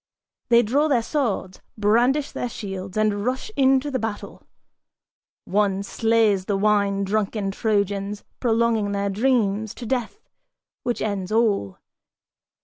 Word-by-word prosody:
They 235 0 +6
draw 280 +8 +2
their 250 -6 +2
swords, 225 -9 -2 0.2
brandish 240 +7 +2
their 245 - -3
shields 195 -2 -6
and 210 -1 +1
rush 255 - -2
into 270 +1 +3
the 260 - -1
battle. 225 -2 -5 1.0
One 200 0 +1
slays 220 -3 +2
the 200 -1 0
wine 200 -1 +2
drunken 205 0 -1
Trojans, 200 -1 -1 0.2
prolonging 225 -3 +1
their 200 0 -1
dreams 220 -2 +1
To 245 - -8
death, 255 - -3 0.5
which 240 -1 -2
ends 200 -2 -3
all. 210 - +1
215 Hz, 125 wpm, -23 LUFS, 200-240 Hz, 1.0 s, They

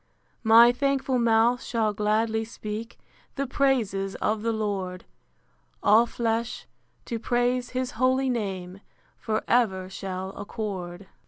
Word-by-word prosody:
My 230 +1 +7
thankful 270 0 0
mouth 235 +1 +3
shall 220 -3 0
gladly 220 +2 +1
speak 220 0 -7 0.4
The 275 - -1
praises 230 -8 0
of 215 0 -1
the 230 +1 0
Lord: 195 -4 -3 0.8
All 220 +3 +5
flesh, 230 0 -2 0.4
to 230 - -4
praise 245 +1 0
his 255 0 -1
holy 260 +3 +1
name, 195 -6 -3 0.3
For 215 -1 -2
ever 190 -6 +1
shall 190 -1 -5
accord. 195 -3 -6
225 Hz, 115 wpm, -26 LUFS, 200-245 Hz, 0.8 s, My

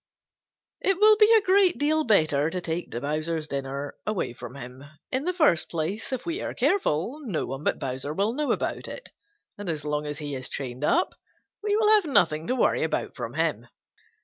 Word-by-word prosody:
It 390 -2 +1
will 430 +1 +7
be 425 +1 +6
a 445 -2 +6
great 375 -1 +4
deal 310 +2 +2
better 155 - +3
to 180 - -3
take 170 0 -3
Bowser's 155 +5 -2
dinner 140 0 -4
away 210 - -1
from 125 +1 -9
him. 130 0 -9 0.3
In 265 +3 -1
the 360 - +2
first 305 - +3
place, 170 +9 -3
if 260 -2 -3
we 340 +3 -3
are - - -4
careful, 260 - +1
no 200 - -2
one 135 +2 -6
but - - +1
Bowser 130 +2 -4
will 200 +8 0
know 295 +2 0
about - - -2
it, - - -9 0.5
and 205 -3 -5
as 155 -2 -3
long 150 0 -2
as 150 0 -4
he 145 -2 -5
is 130 -1 -5
chained 130 0 -5
up, 350 - +2 0.5
we 415 0 +1
will 425 0 +3
have 425 -4 +6
nothing 170 - +2
to 255 - +1
worry - - +2
about - - -2
from - - -6
him. - - -1
170 Hz, 200 wpm, -26 LUFS, -, 0.5 s, will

